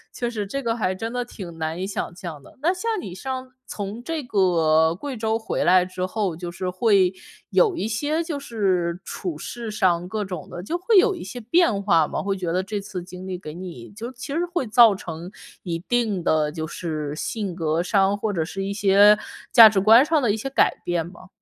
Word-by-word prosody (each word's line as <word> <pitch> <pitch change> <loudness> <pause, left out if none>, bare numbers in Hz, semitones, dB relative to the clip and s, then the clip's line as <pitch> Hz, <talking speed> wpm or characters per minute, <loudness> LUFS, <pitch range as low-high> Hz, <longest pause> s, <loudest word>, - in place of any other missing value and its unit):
确 240 -1 -2
实 210 -4 -4
这 275 +6 -4
个 230 -1 -1
还 185 -4 0
真 225 +4 -4
的 245 0 -2
挺 175 -8 -9
难 160 +1 -3
以 185 - -3
想 195 -3 -4
象 170 -5 -8
的。 - - -18
那 345 +4 +2
像 415 +5 -3
你 180 - -7
上 260 +6 -5 0.2
从 205 +3 -5
这 315 +2 -4
个 165 -6 +3
贵 265 +4 -6
州 220 0 0
回 220 - -2
来 180 +1 +6
之 185 0 -4
后， 185 -4 -2
就 175 -1 -5
是 180 +1 -4
会 190 -1 +3 0.4
有 420 -7 +3
一 275 - -2
些 295 +9 -1
就 315 -4 -4
是 185 -9 -1
处 175 -6 -5
事 235 +6 -6
上 180 -4 +1
各 210 +2 -3
种 180 -5 -7
的 175 - -7
就 330 - -2
会 390 +4 +3
有 415 +2 +5
一 - - -8
些 235 +6 -7
变 230 - +2
化 165 -6 +4
吗？ - - -3
会 195 -1 -1
觉 180 -3 -3
得 185 - +1
这 205 +1 -3
次 195 -3 -6
经 185 +1 -10
历 185 -1 -4
给 155 -4 -9
你 175 -8 -9
就 225 +4 -7
其 255 +3 -8
实 325 +5 -1
会 345 -6 -2
造 225 -2 +6
成 170 -1 -7 0.3
一 170 -3 -3
定 215 -3 -1
的 155 -1 +2
就 160 +1 -4
是 155 -3 -4
性 205 -5 -3
格 165 0 0
上， 195 +1 +2
或 210 0 -2
者 165 -4 -1
是 195 +3 -5
一 195 - -3
些 205 +1 +5 0.3
价 230 -3 +10
值 200 -3 +2
观 225 +7 +7
上 310 -2 +2
的 230 -5 +2
一 215 - -1
些 270 +5 -4
改 - - +2
变 175 -2 0
吗？ 185 +1 -13
195 Hz, 240 characters per minute, -23 LUFS, 175-235 Hz, 0.4 s, 价